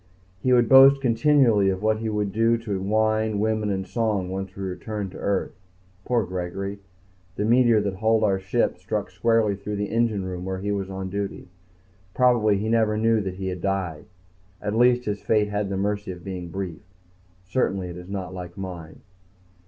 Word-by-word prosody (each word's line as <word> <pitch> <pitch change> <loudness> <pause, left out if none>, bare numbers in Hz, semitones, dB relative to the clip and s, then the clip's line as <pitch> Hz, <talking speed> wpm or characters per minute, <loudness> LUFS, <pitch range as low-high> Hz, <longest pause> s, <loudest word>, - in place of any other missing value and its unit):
He 130 - +1
would 120 -2 +5
boast 135 +2 +8
continually 120 -5 +3
of 95 +1 -2
what 110 0 +2
he 110 0 -2
would 105 -2 -1
do 115 +2 +3
to 105 -4 -4
wine, 110 +1 +1
women, 110 0 0
and 95 -1 -2
song 100 -2 -1
once 95 0 -5
we 100 - -6
returned 100 +1 -4
to - - -10
Earth. 100 -1 -1 0.5
Poor 120 -4 +1
Gregory. 95 +3 -4 0.6
The 105 - -1
meteor 120 -1 +4
that 100 -2 -3
hulled 110 +1 +2
our 100 -3 +2
ship 95 0 0
struck - - -3
squarely 115 -3 +2
through 105 +1 -5
the 100 0 -3
engine 115 -4 0
room 90 -1 -5
where 95 0 -3
he 100 +2 -3
was 100 -1 -2
on 95 -1 -5
duty. 100 -2 -4 0.7
Probably 120 -5 +3
he 105 +2 -2
never 110 -1 +2
knew 115 0 +2
that 95 -2 -4
he 95 0 -4
had 90 -1 -5
died. 95 -5 -2 0.5
At 105 +3 -3
least 125 +1 +4
his 105 -1 -3
fate 105 -2 +1
had 105 -1 -2
the 95 - -2
mercy 100 0 -2
of 90 -1 -10
being 90 -3 -6
brief. 90 -2 -5 0.6
Certainly 95 -4 -1
it 85 - -8
is 90 +1 -10
not 95 -2 -5
like 90 0 -8
mine. 90 -4 -8
100 Hz, 190 wpm, -24 LUFS, 95-110 Hz, 0.7 s, boast